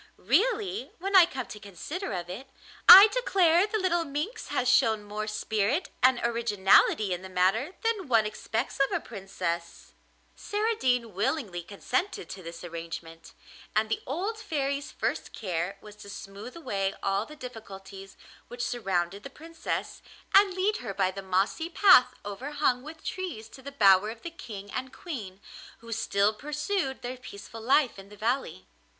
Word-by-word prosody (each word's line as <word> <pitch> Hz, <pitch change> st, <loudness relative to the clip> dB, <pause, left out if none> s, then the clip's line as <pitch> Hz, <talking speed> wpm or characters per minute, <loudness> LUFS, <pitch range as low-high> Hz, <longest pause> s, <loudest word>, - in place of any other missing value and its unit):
Really, 400 Hz, -, 0 dB
when 390 Hz, +3 st, -2 dB
I 360 Hz, -3 st, +9 dB
come 260 Hz, -7 st, -5 dB
to 210 Hz, -, -9 dB
consider 210 Hz, -, -6 dB
of 175 Hz, -2 st, -4 dB
it, 205 Hz, +10 st, -8 dB, 0.4 s
I 395 Hz, +3 st, +13 dB
declare 385 Hz, -6 st, +3 dB
the 435 Hz, -, -1 dB
little 355 Hz, -4 st, +1 dB
minx 300 Hz, -, -4 dB
has 255 Hz, -, -1 dB
shown 220 Hz, -4 st, +3 dB
more 210 Hz, +1 st, -5 dB
spirit 215 Hz, -, -1 dB
and 255 Hz, -1 st, +5 dB
originality 210 Hz, -3 st, +3 dB
in 180 Hz, -, -4 dB
the 190 Hz, -, -9 dB
matter 195 Hz, -, +1 dB
than 440 Hz, -6 st, 0 dB
one 225 Hz, -4 st, +4 dB
expects 220 Hz, +4 st, -3 dB
of 275 Hz, -, +2 dB
a -, -, +1 dB
princess.' 180 Hz, -5 st, -5 dB, 0.4 s
Saradine 260 Hz, -, 0 dB
willingly 200 Hz, -, -1 dB
consented 250 Hz, -, -3 dB
to 190 Hz, -, -8 dB
this 170 Hz, 0 st, -9 dB
arrangement, 165 Hz, -1 st, -8 dB, 0.4 s
and 215 Hz, 0 st, +2 dB
the -, -, -1 dB
old 385 Hz, -, -3 dB
Fairy's 280 Hz, -6 st, -2 dB
first -, -, -3 dB
care 185 Hz, -1 st, -3 dB
was 210 Hz, -1 st, -12 dB
to 200 Hz, -1 st, -12 dB
smooth 200 Hz, +5 st, -9 dB
away 195 Hz, -11 st, -2 dB
all 195 Hz, +2 st, 0 dB
the 305 Hz, -, -11 dB
difficulties 195 Hz, -7 st, -10 dB, 0.3 s
which 240 Hz, 0 st, -4 dB
surrounded 195 Hz, -4 st, -1 dB
the 275 Hz, -, -9 dB
Princess, 325 Hz, +4 st, -5 dB, 0.3 s
and 395 Hz, -2 st, +6 dB
lead 395 Hz, +3 st, +1 dB
her 210 Hz, -6 st, -6 dB
by 185 Hz, -, +1 dB
the 195 Hz, +1 st, -7 dB
mossy 195 Hz, -, 0 dB
path 330 Hz, -9 st, +6 dB
overhung 255 Hz, +4 st, -1 dB
with 315 Hz, +3 st, -11 dB
trees 345 Hz, -13 st, -5 dB
to 265 Hz, -, -13 dB
the 280 Hz, +2 st, -8 dB
bower 200 Hz, -5 st, +5 dB
of 225 Hz, +1 st, -9 dB
the 340 Hz, -, -5 dB
King 205 Hz, -11 st, -9 dB
and 260 Hz, 0 st, -4 dB
Queen, 215 Hz, -, -7 dB, 0.4 s
who 230 Hz, 0 st, -12 dB
still 205 Hz, -1 st, +1 dB
pursued 300 Hz, -, -3 dB
their 250 Hz, +1 st, -5 dB
peaceful 225 Hz, -2 st, -10 dB
life 255 Hz, -1 st, +2 dB
in 195 Hz, +1 st, -12 dB
the 210 Hz, -, -13 dB
valley. 240 Hz, +6 st, -2 dB
235 Hz, 160 wpm, -28 LUFS, 195-315 Hz, 0.4 s, I